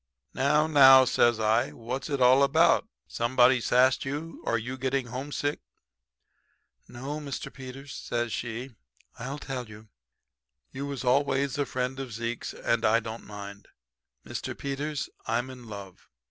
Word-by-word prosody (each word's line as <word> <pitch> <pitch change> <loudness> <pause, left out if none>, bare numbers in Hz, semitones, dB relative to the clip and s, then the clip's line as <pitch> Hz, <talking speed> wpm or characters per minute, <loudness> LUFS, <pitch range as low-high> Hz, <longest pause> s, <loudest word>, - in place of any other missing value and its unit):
"'Now, 150 +3 +3
now,' 135 -4 +8
says 120 -2 +3
I, 110 0 +2
'what's 125 +6 -5
it 140 -2 -1
all 130 +2 +6
about? 160 +9 +4 0.2
Somebody 125 +1 +3
sassed 130 +3 +3
you 150 +4 -5
or 115 - +2
you 125 +3 -5
getting 130 0 -1
homesick?' 140 +4 -3 1.3
"'No, 135 +5 -6
Mr. 140 -3 -6
Peters,' 135 +1 -9
says 120 -1 -3
she. 120 +3 -4 0.5
'I'll 135 +5 -5
tell 130 -5 -6
you. 105 0 -13 0.8
You 140 +2 -5
was 140 -2 -5
always 140 +1 +1
a 140 - 0
friend 130 +1 -3
of 130 -4 -6
Zeke's, 115 +1 -4
and 115 -1 0
I 115 +2 +4
don't 115 0 -8
mind. 100 -1 -9 0.6
Mr. - - -5
Peters, 140 +1 -3 0.2
I'm 120 +3 -1
in 125 -2 -12
love. 100 -3 -10
130 Hz, 145 wpm, -28 LUFS, 115-140 Hz, 1.3 s, now